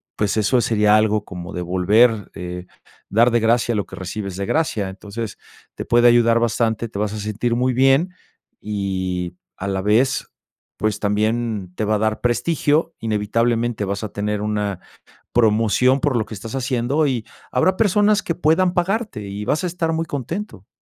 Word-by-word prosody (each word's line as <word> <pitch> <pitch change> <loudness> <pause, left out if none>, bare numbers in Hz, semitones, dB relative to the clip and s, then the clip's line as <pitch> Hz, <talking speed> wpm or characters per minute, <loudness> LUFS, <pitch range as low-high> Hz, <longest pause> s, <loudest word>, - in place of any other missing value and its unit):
pues, 105 0 0
eso 120 +4 +3
sería 105 -1 +3
algo 110 -1 +2
como 90 -2 -8
de 90 - -3
volver, 100 +5 +3
eh, 90 0 -6 0.4
dar 120 +4 +4
de 120 - +3
gracia 120 +1 +2
lo 105 - -1
que - - -11
recibes 95 0 -5
de 100 - -2
gracia. 110 -9 0
Entonces 105 +3 -7 0.4
te - - -6
puede 120 0 +4
ayudar 115 -1 +5
bastante, 115 -1 0
te 100 - -6
vas 105 -1 -1
a - - -4
sentir 110 +3 -1
muy 125 +1 +1
bien 135 +8 +3 0.5
y 95 -4 -3 0.2
a 100 - -4
la 95 -1 -1
vez, 115 +7 +2 0.5
pues, 110 0 -1
también 105 -2 -1
te - - -2
va 110 - +1
a - - +2
dar 110 0 0
prestigio, 145 +6 +1
inevitablemente 115 +1 0
vas 100 +2 -3
a 110 - -3
tener 105 +1 -2
una 105 -3 -2 0.5
promoción 115 +3 +3
por 140 -3 +1
lo 110 - +1
que - - -8
estás 110 +4 -8
haciendo 135 +3 0
y 125 -5 -1 0.3
habrá 185 +9 +2
personas 210 0 +3
que 170 - -2
puedan 175 +3 +2
pagarte 195 - -1
y 100 +1 -5
vas 145 - 0
a - - +1
estar 165 -2 -1
muy 165 0 -1
contento. 145 - -5
115 Hz, 175 wpm, -21 LUFS, 105-130 Hz, 0.5 s, ayudar